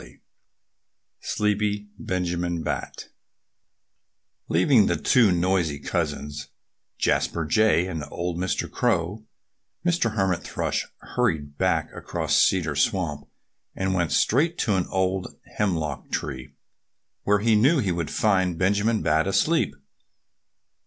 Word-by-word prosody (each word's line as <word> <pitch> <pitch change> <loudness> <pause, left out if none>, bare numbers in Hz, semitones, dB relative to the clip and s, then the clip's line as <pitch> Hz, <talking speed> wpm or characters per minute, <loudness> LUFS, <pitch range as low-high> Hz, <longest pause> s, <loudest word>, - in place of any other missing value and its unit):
XXIII - - -16 1.0
SLEEPY 105 -1 -1
BENJAMIN 90 -5 -2
BAT - - -4 1.4
LEAVING 105 - +4
the - - +1
two 115 -6 +4
noisy 90 -3 +1
cousins 75 0 -3 0.5
(Jasper 85 -2 0
Jay 105 +1 +3
and 80 -5 -4
old 85 0 -3
Mr. 95 0 -1
Crow) 95 +6 -1 0.6
Mr. 170 -11 +1
Hermit 95 -4 +1
Thrush - - -2 0.3
hurried 80 -13 0
back - - +1
across - - -2
Cedar - - +3
Swamp 75 -7 0 0.5
and 95 0 -1
went 85 -3 0
straight 160 +8 +2
to 105 - +1
an 90 -2 0
old 95 -1 -1 0.2
hemlock 80 -8 -1
tree, 65 -1 -5 0.7
where 105 0 +3
he 115 0 +3
knew 135 +10 +4
he 105 -9 0
would 85 -3 -2
find 95 +1 +1
Benjamin 105 +5 +1
Bat 80 +3 +2
asleep. 100 - +1
95 Hz, 115 wpm, -25 LUFS, 85-105 Hz, 1.4 s, LEAVING